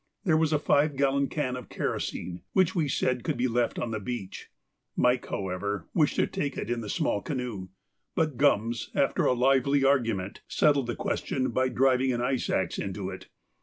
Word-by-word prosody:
There 170 -7 +3
was 160 -1 +2
a 155 - +4
five 145 0 +2
gallon 140 0 +2
can 130 -4 -2
of 125 -2 -8
kerosene 90 0 -3
which 185 -3 +3
we 165 -5 +1
said 130 -2 0
could - - -1
be 125 +1 +1
left 120 0 0
on 120 - -2
the 110 - -2
beach; 105 -2 -6 0.5
Mike, 125 0 +2
however, 95 -1 -3
wished 155 -4 +2
to - - +3
take 145 - -3
it - - -3
in 120 -1 -1
the 105 - -6
small 100 - 0
canoe, 120 -9 -4 0.5
but 155 -4 +1
Gums, 115 -4 +1
after 140 - +2
a - - +4
lively 135 +2 +3
argument, 115 -8 +1
settled 140 -4 +2
the 120 - -2
question 130 -2 -1
by 130 +2 +1
driving 130 0 +3
an 120 - -1
ice 130 0 -1
axe - - 0
into 95 -1 -4
it. 95 - -9
125 Hz, 190 wpm, -28 LUFS, 115-140 Hz, 0.5 s, a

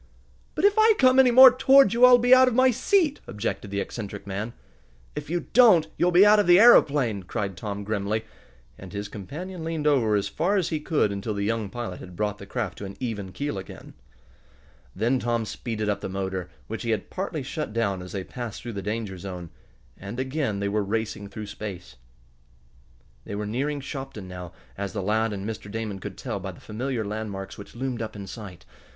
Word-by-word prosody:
"But 320 - +1
if 405 - +6
I 440 0 +6
come 255 0 +5
any 260 -1 +7
more 260 +1 +10
toward 265 -4 +6
you 240 +2 +7
I'll 250 -1 +8
be 245 +1 +5
out 255 0 +7
of 250 - +1
my 260 0 +5
seat!" 300 - +2
objected 105 -1 -4
the 100 0 -2
eccentric 105 -1 -6
man. 100 +4 -4 0.6
"If - - -6
you 175 +1 -1
don't 220 -10 +6
you'll 175 - +2
be 180 +3 +7
out 210 0 +6
of 205 - +2
the 175 +1 +7
aeroplane!" 140 - +5
cried 100 +1 -4
Tom 100 +3 -5
grimly, 105 +1 -2 0.5
and 95 0 -10
his 100 0 -4
companion 160 - -7
leaned 160 -2 -3
over 125 -8 +3
as 100 - 0
far 195 +5 0
as 180 -4 0
he 155 - -1
could 150 -8 +1
until 100 +2 -3
the 100 0 -2
young 110 -1 -1
pilot 110 -4 -6
had 90 -1 -11
brought 105 +1 -2
the 100 - -10
craft 110 -9 -4
to 100 - -6
an 95 - -9
even 105 -7 -4
keel 110 +1 -3
again. 95 - -11 1.0
Then 120 +6 +1
Tom 120 -2 -1
speeded 110 -1 -4
up 105 - -1
the - - -4
motor, 95 -2 -4 0.2
which 115 - -6
he 115 - -4
had 110 -3 -2
partly 180 -6 -3
shut 150 0 -4
down 100 -5 -1
as 90 - -9
they 95 -2 -3
passed 120 +1 -7
through 120 -1 -6
the 100 - -4
danger 105 -2 -4
zone, 90 -3 -7 0.4
and 100 +6 -7
again 130 -5 -2
they 100 - -1
were 105 +1 0
racing 105 0 -3
through 105 +1 -7
space. 100 -8 -8 1.3
They 100 - -6
were 105 +1 -3
nearing 140 +7 -2
Shopton 135 -8 -7
now, 90 -1 -8 0.3
as 100 -1 -3
the 100 -3 -3
lad 110 +3 +1
and 100 0 -5
Mr. 110 -2 -6
Damon 110 -2 -4
could - - -8
tell - - -4
by - - -6
the - - -15
familiar 120 +1 -3
landmarks 100 -2 -5
which 100 - -11
loomed 125 -1 -3
up 110 - -5
in 100 -1 -7
sight. 95 -3 -10
110 Hz, 210 wpm, -25 LUFS, 100-150 Hz, 1.3 s, more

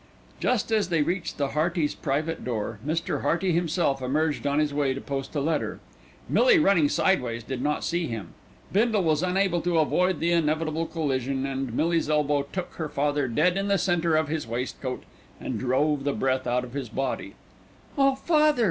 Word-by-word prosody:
Just 240 -3 0
as 215 -3 +2
they 165 -3 +2
reached 170 +2 -3
the 140 -2 0
Heartys' 155 +1 0
private 155 +3 -2
door, 110 -3 -3
Mr. 160 +4 -1
Hearty 175 +2 +1
himself 165 -4 +1
emerged 145 +3 0
on 140 0 +1
his 150 -1 +1
way 140 -2 +1
to - - -4
post 135 +1 -5
a - - +1
letter. 155 +1 -1 0.5
Millie - - +5
running 195 - +4
sideways 120 -12 +1
did 125 +1 -4
not 150 +2 -1
see 170 0 -1
him. 110 -7 -5 0.4
Bindle 215 -1 +3
was 155 -2 +2
unable 185 -1 +1
to 175 -1 0
avoid 180 +4 +2
the 170 +1 +1
inevitable 160 0 0
collision, 135 -4 -1
and 135 -2 -3
Millie's 165 +1 +1
elbow 150 -1 +2
took 185 -2 -4
her 160 -2 -3
father 145 -1 0
dead 165 +10 +2
in 195 0 -1
the 200 0 +3
centre 170 -4 +1
of 155 -1 +2
his 155 -3 -3
waistcoat 125 +2 -4 0.4
and 120 -4 -4
drove 135 +4 +1
the 140 0 0
breath 130 -1 0
out 125 +1 +1
of 125 -1 -9
his 135 -4 -4
body. 130 +3 -3 0.6
"Oh, 275 -2 +3
father!" 300 -1 +3
155 Hz, 185 wpm, -26 LUFS, 135-175 Hz, 0.6 s, Millie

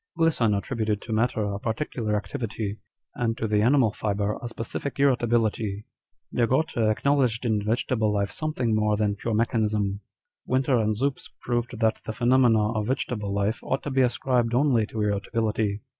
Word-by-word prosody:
Glisson 150 -11 +2
attributed 110 -1 -1
to 115 - -4
matter 110 0 +1
a 100 -1 -2
particular 110 -1 -2
activity, 105 -2 -4 0.3
and 115 -2 -1
to - - -2
the 105 -1 +2
animal 125 -1 +4
fibre 105 0 -1
a 120 - -4
specific 115 +5 -5
irritability. 115 -6 +1 0.5
De 120 -1 +2
Gorter 120 -4 +1
acknowledged 125 0 +1
in 110 -3 +1
vegetable 110 0 0
life 100 -1 0
something 140 -7 -1
more 105 -1 +2
than 105 -1 +1
pure 110 +2 -2
mechanism. 105 -3 0 0.5
Winter 130 -1 +2
and 110 -1 +1
Zups 135 +2 -2
proved 120 -1 -2
that 110 0 +2
the 110 - -4
phenomena 120 -2 +3
of 105 -2 -2
vegetable 115 -5 -2
life 100 +3 0
ought 135 - -2
to 145 - -4
be 135 0 +3
ascribed 120 -1 +1
only 125 -5 +3
to 110 - -6
irritability. 105 0 -1
115 Hz, 160 wpm, -26 LUFS, 105-125 Hz, 0.5 s, animal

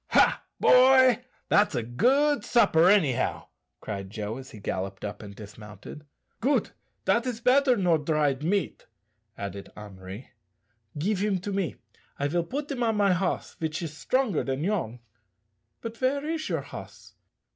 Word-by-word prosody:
"Ha, - - +3 0.2
boy! 255 -1 +6 0.2
that's 205 -7 +3
a 120 - -1
good 270 - +2
supper, 180 -8 +4
anyhow," 165 -12 +2 0.3
cried 100 -2 -5
Joe, 105 +2 -5
as 130 0 -10
he 110 - -11
galloped 95 0 -4
up 105 0 -6
and 100 -2 -10
dismounted. 105 +7 -11 0.3
"Goot! 275 +5 +1 0.3
dat 235 +2 +2
is 240 -3 -3
better 255 +1 +4
nor 175 -5 +2
dried 150 -2 0
meat," 195 +4 -1 0.5
added 100 0 -7
Henri. 100 +2 -10 0.7
"Give 190 +6 0
him 200 -1 +1
to 205 - -4
me; 195 -3 -1 0.4
I 140 - 0
will 170 +2 0
put 285 - -5
him 260 -3 -3
on 225 -2 +1
my 200 -2 +4
hoss, 185 +1 -2
vich 160 +1 -4
is 160 - -4
strongar 255 - 0
dan 135 +2 -2
yourn. 165 - -2 0.8
But 230 0 -6
ver 280 +3 0
is 315 0 -3
your - - -1
hoss?" - - -11
175 Hz, 155 wpm, -27 LUFS, -, 0.8 s, boy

